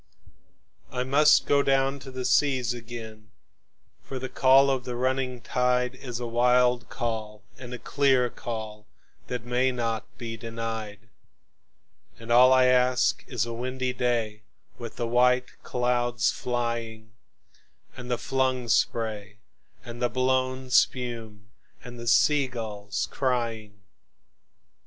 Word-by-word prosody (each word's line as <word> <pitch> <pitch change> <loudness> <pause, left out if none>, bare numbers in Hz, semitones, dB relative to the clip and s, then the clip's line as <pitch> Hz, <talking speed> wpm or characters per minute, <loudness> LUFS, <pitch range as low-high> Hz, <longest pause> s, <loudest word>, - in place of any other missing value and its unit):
I 125 - -2
must 145 +4 +4
down 135 -1 +2
go 140 - -10
to 135 - -10
the 130 -1 -5
seas 130 -5 +2
again, 115 -2 -9 0.7
for 135 - -7
the 130 0 -5
call 135 +1 +5
of 130 -2 -1
the 125 -1 -5
running 130 0 -1
tide 125 0 0
Is 125 -2 -7
a 120 - -4
wild 125 0 +2
call 110 -2 -4 0.2
and 125 -2 -9
a 125 - -5
clear 135 -1 +2
call 110 -3 -7 0.4
that 125 -1 -5
may 125 +2 +1
not 115 -2 -3
be 115 -2 -6
denied; 115 -2 -6 1.1
And 115 +1 -8
all 125 +2 +7
I 130 -1 +5
ask 125 0 +2
is 120 -4 -1
a 115 - -5
windy 130 +1 -3
day 115 -4 -1 0.4
with 115 -2 -7
the 120 - -2
white 125 +1 +2
clouds 120 -1 0
flying, 115 -2 -4 0.8
And 125 0 -9
the 120 - 0
flung 130 -2 -1
spray 105 -3 0 0.5
and 120 0 -9
the 120 - +2
blown 130 +1 -1
spume, 115 -5 0 0.3
and 120 -1 -10
the 120 - -8
sea 145 +3 +4
gulls 105 -5 -4
crying. 115 -6 -2
125 Hz, 130 wpm, -26 LUFS, 115-130 Hz, 1.1 s, all